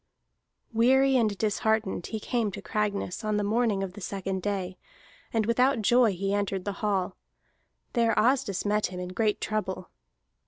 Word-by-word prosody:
Weary 265 +4 +4
and 215 -5 +2
disheartened, 220 -3 0
he 220 - -4
came 230 0 -1
to 200 - -6
Cragness 205 0 -2
on 215 -1 0
the 205 - 0
morning 215 -1 +1
of 185 -2 -5
the 205 - -10
second 190 0 -3
day, 190 -2 -3 0.5
and 225 -2 +1
without 250 +1 +2
joy 240 +1 +5
he 195 +2 -2
entered 200 -2 -1
the 205 - -1
hall. 195 -3 0 0.8
There 230 -2 +2
Asdis 245 -5 +2
met 210 +1 +2
him 180 0 -7
in 180 0 -5
great 210 +3 0
trouble. 200 -4 -3
210 Hz, 160 wpm, -28 LUFS, 195-230 Hz, 0.8 s, joy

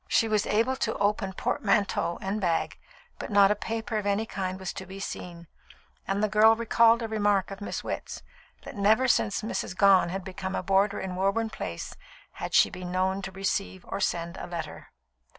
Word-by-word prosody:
She 225 - +3
was 215 -2 +1
able 230 +5 +2
to 225 - -1
open 200 -1 0
portmanteau 185 -3 0
and 200 +2 -2
bag, 170 -3 -1 0.4
but - - -5
not 200 -1 +5
a - - +2
paper 220 +1 -3
of 205 - -4
any 205 +2 +1
kind 190 -3 -4
was 190 0 -4
to 190 - -8
be 190 +1 -9
seen, 175 -3 -7 0.6
and 200 +2 0
the - - +4
girl 215 +2 +5
recalled 230 0 +4
a - - -2
remark 205 -3 +1
of 195 +1 -8
Miss 205 - -4
Witt's, - - -5 0.4
that - - -9
never 215 +6 +3
since 215 -3 +1
Mrs. 210 -3 -3
Gone 195 -3 +5
had 190 +2 -4
become 190 0 -5
a - - -2
boarder 195 +2 +2
in 185 -1 -4
Woburn 200 +4 0
Place 85 - -6 0.4
had - - -5
she - - +5
been 180 0 -7
known 190 +1 0
to 190 - -6
receive 190 -1 -3
or - - -4
send 170 -3 -2
a - - -6
letter. 165 -3 -6
195 Hz, 195 wpm, -27 LUFS, 190-215 Hz, 0.6 s, not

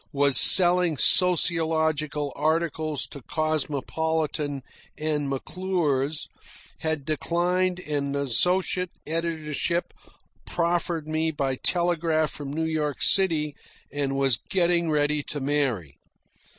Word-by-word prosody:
was 140 -1 +2
selling 175 -3 +6
sociological 160 -4 +1
articles 155 -2 -1
to 140 - -10
"Cosmopolitan" 155 -1 -2 0.3
and 150 -2 -1
"McClure's," 155 -1 -2 0.5
had 160 -3 -2
declined 175 +4 0
an 140 -3 -2
associate 180 +7 +1 0.2
editorship 165 +1 -2 0.5
proffered 170 -2 -1
me 155 +1 0
by 140 -4 -2
telegraph 165 -1 +1
from 140 -2 -7
New 160 +2 -2
York 155 -3 -2
City, 160 -6 +2 0.4
and 140 -1 -2
was 135 -4 +2
getting 170 -2 +2
ready 150 0 +1
to 145 0 -6
marry. 130 - -1
155 Hz, 100 wpm, -25 LUFS, 145-170 Hz, 0.5 s, selling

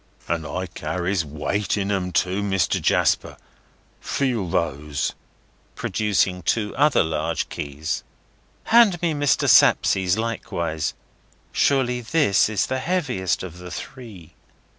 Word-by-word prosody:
"And 80 -2 -2
I 90 0 -3
carries 90 +1 -2
weight 80 +8 -2
in 100 0 -1
'em 90 -2 -1
too, 90 +3 0
Mr. 95 -2 0
Jasper. - - +1 0.6
Feel 120 -9 -1
those!" 75 -3 -1 0.6
producing 100 -4 0
two 105 +3 -1
other 150 +1 +4
large 80 -1 -2
keys. 75 +2 -4 0.7
"Hand 225 -7 +6
me 165 -2 +2
Mr. 145 -2 +1
Sapsea's 95 0 +4
likewise. 85 -8 -3 0.6
Surely 125 -3 +1
this 120 - +2
is 110 -3 +1
the 130 0 -2
heaviest 130 - -1
of 90 -1 -8
the 90 0 -9
three." 105 - -9
95 Hz, 120 wpm, -23 LUFS, 85-125 Hz, 0.7 s, Hand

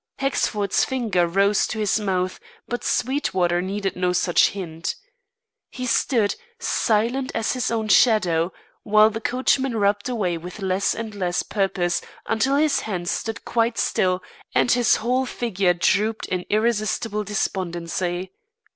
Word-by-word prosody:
Hexford's 210 -7 0
finger 220 -10 0
rose 195 +4 +2
to 220 - -5
his 215 0 +1
mouth, 185 -3 -1 0.3
but 245 - -4
Sweetwater 185 -10 0
needed 195 +1 -3
no 180 0 0
such 175 -1 +4
hint. 170 -4 -5 0.7
He 255 - -6
stood, 230 -3 +2 0.2
silent 245 - 0
as 225 -1 0
his 255 -3 -1
own 220 -1 -1
shadow, 185 -7 +4 0.3
while 215 +1 +5
the 225 +1 -5
coachman 260 0 +1
rubbed 205 +2 +1
away 185 -9 -1
with 180 +5 -9
less 190 0 0
and 225 -2 -5
less 180 -3 -1
purpose, 190 -4 0 0.2
until 260 +5 +1
his 300 0 +3
hands 180 -5 -3
stood 225 0 -4
quite 230 0 0
still 185 0 +1 0.3
and - - +3
his 240 -1 +4
whole 255 +3 0
figure 195 -8 0
drooped 210 +5 +1
in 180 -1 -3
irresistible 215 -1 0
despondency. 180 -2 -2
210 Hz, 140 wpm, -23 LUFS, 185-230 Hz, 0.7 s, while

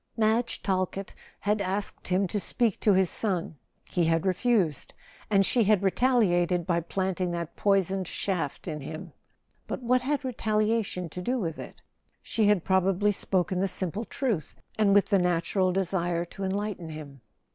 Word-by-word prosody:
Madge 225 +2 +1
Talkett 190 0 -1 0.3
had 210 0 +1
asked 195 +1 -3
him 185 +2 +2
to 205 - -2
speak 220 +3 0
to 210 - +4
his 190 0 +4
son: 180 -6 -1 0.3
he 175 -2 +2
had 165 +2 +1
refused, 190 - +1 0.3
and 195 -2 +4
she 235 +1 +2
had 205 -1 +3
retaliated 185 -6 +2
by 170 -1 +1
planting 185 +1 -2
that 170 -1 -4
poisoned 195 -2 +1
shaft 180 -9 -3
in 150 -1 -4
him. 160 +3 -7 0.5
But - - -4
what 250 +1 +3
had 285 +2 -1
retaliation 215 -5 0
to 180 - -6
do 250 +8 0
with 165 -8 -3
it? - - -10 0.4
She 220 -2 +1
had 205 -5 +3
probably 190 +2 +2
spoken 185 -2 0
the 195 - +2
simple 185 +3 -3
truth, 225 - -2 0.2
and 205 -2 +3
with 205 - +6
the 200 -3 +2
natural 180 +2 +1
desire 175 -2 0
to 195 +3 -8
enlighten 195 -3 -3
him. 145 -4 -9
190 Hz, 160 wpm, -28 LUFS, 175-210 Hz, 0.5 s, with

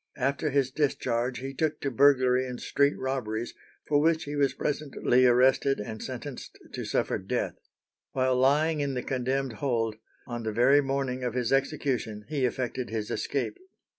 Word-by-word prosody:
After 140 +4 0
his 135 -2 +1
discharge 125 -4 0
he 135 +1 -5
took 155 +2 -1
to 140 - -1
burglary 130 -1 +4
and 125 -1 -6
street 140 0 +1
robberies, 120 -4 -3 0.3
for 145 -1 +3
which 160 +1 +2
he 145 +1 -5
was 140 -2 +1
presently 135 -4 +1
arrested 130 +2 +4
and 110 +1 -6
sentenced 130 +1 -7 0.2
to - - -4
suffer - - 0
death. - - -2 0.6
While 130 -1 +1
lying 150 +4 +3
in 140 -2 -1
the 125 - -2
condemned 130 0 -1
hold, 115 -5 0 0.3
on 120 -1 -5
the 110 -1 -2
very 130 +6 +5
morning 135 -2 -2
of 125 -1 -2
his 125 0 0
execution 135 -6 -1
he 145 -4 0
effected 125 0 -2
his 110 -1 -3
escape. 145 - -2
130 Hz, 165 wpm, -28 LUFS, 125-140 Hz, 0.6 s, very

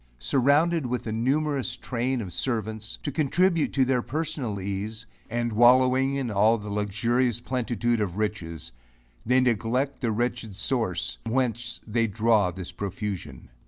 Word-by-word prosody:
Surrounded 140 - +2
with 125 0 -2
a 110 - -3
numerous 135 +2 0
train 125 +1 -2
of 95 -5 -6
servants, 110 +2 -3
to 145 - -2
contribute 165 +4 +2
to 135 -2 +3
their 125 -1 +2
personal 145 -7 -3
ease, 100 +4 -4 0.2
and 120 0 -1
wallowing 130 +3 +5
in 130 -4 -2
all 105 +3 +4
the 105 -1 -7
luxurious 115 +4 0
plenitude 120 -2 -1
of 95 -3 -2
riches, 85 -9 -3 0.6
they 125 +2 +5
neglect 125 +3 0
the 120 -3 +1
wretched 115 -2 -2
source, 110 -3 -1
whence 120 0 -1
they 115 +1 +1
draw 110 -2 +3
this 90 0 -7
profusion. 95 - -5
120 Hz, 140 wpm, -26 LUFS, 105-130 Hz, 0.6 s, wallowing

